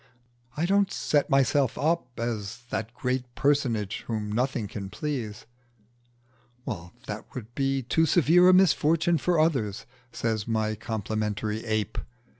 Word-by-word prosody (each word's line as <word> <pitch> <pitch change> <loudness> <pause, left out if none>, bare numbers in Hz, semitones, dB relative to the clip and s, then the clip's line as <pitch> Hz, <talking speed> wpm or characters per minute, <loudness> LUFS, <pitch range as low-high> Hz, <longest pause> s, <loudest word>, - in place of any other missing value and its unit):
"I 160 - +1
don't 200 +1 +3
set 145 0 +1
myself 135 -1 +3
up 150 -6 -1
as 115 -1 -3
the 110 - -1
great 125 -1 -2
personage 120 -8 +1
whom 110 -2 -2
nothing 120 -1 0
can 100 -1 -6
please." 120 -1 -4 1.6
"That - - -6
would 120 -1 -7
be 135 0 0
too 160 +7 +2
severe 175 +3 +5
a - - +8
misfortune 165 -2 +4
for 175 +2 +1
others," 130 -11 +1 0.3
says 110 -3 -2
my 110 -1 0
complimentary 110 0 -3
ape. 110 -1 -1
125 Hz, 125 wpm, -27 LUFS, 110-150 Hz, 1.6 s, a